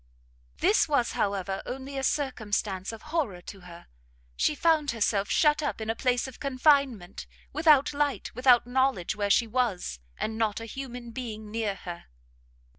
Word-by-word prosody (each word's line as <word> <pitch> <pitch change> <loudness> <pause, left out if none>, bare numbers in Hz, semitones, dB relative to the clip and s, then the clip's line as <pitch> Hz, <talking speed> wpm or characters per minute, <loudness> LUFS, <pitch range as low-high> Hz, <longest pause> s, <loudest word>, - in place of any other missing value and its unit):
This 215 - +3
was, 280 -5 +2
however, 195 -1 -1
only 270 +2 -6
a 270 - -2
circumstance 215 -9 -1
of 225 -1 -10
horror 240 - 0
to 195 +2 -10
her: 175 -2 -13 0.5
she 300 - +1
found 310 -1 +2
herself 205 -3 0
shut 300 -1 +3
up 290 - -2
in 220 0 -1
a - - -4
place 250 +1 0
of 260 - -11
confinement, 270 - +1 0.3
without 300 -2 +4
light, 285 -1 -1
without 250 0 +5
knowledge 250 -7 +1
where 205 -1 -1
she 230 +4 +4
was, 220 - -1 0.2
and 220 +1 -3
not 220 -2 0
a 225 - -7
human 245 0 -7
being 220 -4 -6
near 220 -3 -1
her! 175 -2 -8
235 Hz, 160 wpm, -28 LUFS, 205-275 Hz, 0.5 s, without